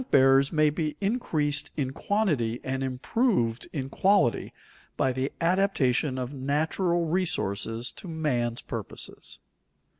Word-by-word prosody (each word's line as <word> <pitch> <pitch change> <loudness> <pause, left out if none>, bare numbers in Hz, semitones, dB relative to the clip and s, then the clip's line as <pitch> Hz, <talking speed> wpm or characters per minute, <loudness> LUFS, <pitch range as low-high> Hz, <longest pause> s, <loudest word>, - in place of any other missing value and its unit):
_Rent 255 - -10
bearers 135 +1 +5
may 155 -2 +3
be 155 -1 -2
increased 155 - 0
in 135 -3 -1
quantity 140 - 0
and 130 0 -2
improved 130 - 0
in 135 -4 -3
quality 150 - +2 0.5
by 130 - +2
the 130 +2 -2
adaptation 165 -7 +2
of 130 +1 -4
natural 160 +6 0
resources 120 - -1
to - - -11
man's 125 -8 -1
purposes. - - -7
145 Hz, 120 wpm, -27 LUFS, 130-170 Hz, 0.5 s, bearers